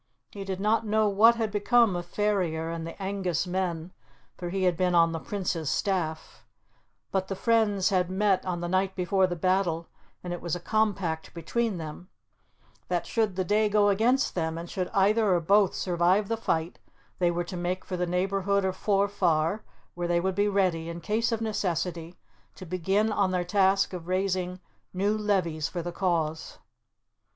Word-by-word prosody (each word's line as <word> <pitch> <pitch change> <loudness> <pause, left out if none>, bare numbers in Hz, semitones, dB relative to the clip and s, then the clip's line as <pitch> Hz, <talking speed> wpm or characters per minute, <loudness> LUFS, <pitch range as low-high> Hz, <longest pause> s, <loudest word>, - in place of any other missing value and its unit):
He 200 - -7
did 190 -1 -4
not 215 +3 +2
know 215 0 +2
what 215 +4 +5
had 225 -2 -2
become 215 0 +3
of 175 0 -4
Ferrier 175 -6 -1
and 165 0 -5
the 165 - -9
Angus 190 -4 -1
men, 180 -2 -3 0.4
for 175 - -5
he 190 +1 -2
had 180 -2 +3
been 180 +1 +1
on 165 -1 +5
the 165 - -3
Prince's 175 -5 -3
staff; 165 -5 -2 0.7
but 190 -1 -1
the 195 - -3
friends 215 -3 +2
had 180 -3 +1
met 195 0 +1
on 175 -2 -3
the 175 - -2
night 190 +1 0
before 185 +1 +2
the 175 - -3
battle, 175 -1 0 0.3
and 175 -1 -4
it 175 - -6
was 170 -1 -2
a - - -5
compact 185 -5 -1
between 215 +5 -1
them, 160 +3 -8 0.8
that, 175 -1 -1
should 220 -5 0
the 185 - 0
day 210 +3 +2
go 205 0 +4
against 235 +7 +2
them, 160 -2 -2
and 170 +1 -7
should 185 -1 -2
either 200 0 +3
or - - +2
both 195 +3 +3
survive 180 +3 +1
the 230 - +1
fight, 165 -7 -2 0.4
they 175 -1 +3
were 175 0 -1
to 175 +2 -7
make 180 +1 -3
for 185 - -4
the 180 0 -1
neighbourhood 195 +2 0
of 190 -1 -1
Forfar, 195 -3 +1 0.3
where 175 0 -3
they 170 0 +2
would 190 +2 -1
be 205 +2 +1
ready, 185 -5 0
in 170 0 -6
case 220 +7 0
of 225 -1 -1
necessity, 180 -5 -2 0.4
to 185 - -10
begin 190 +5 0
on 200 -2 +1
their 180 -1 0
task 195 +1 +2
of 175 -2 -7
raising 185 -1 -1 0.3
new 200 +3 +1
levies 185 -8 0
for 175 -2 -5
the 175 - -4
cause. 165 -4 -2
185 Hz, 185 wpm, -27 LUFS, 175-205 Hz, 0.8 s, what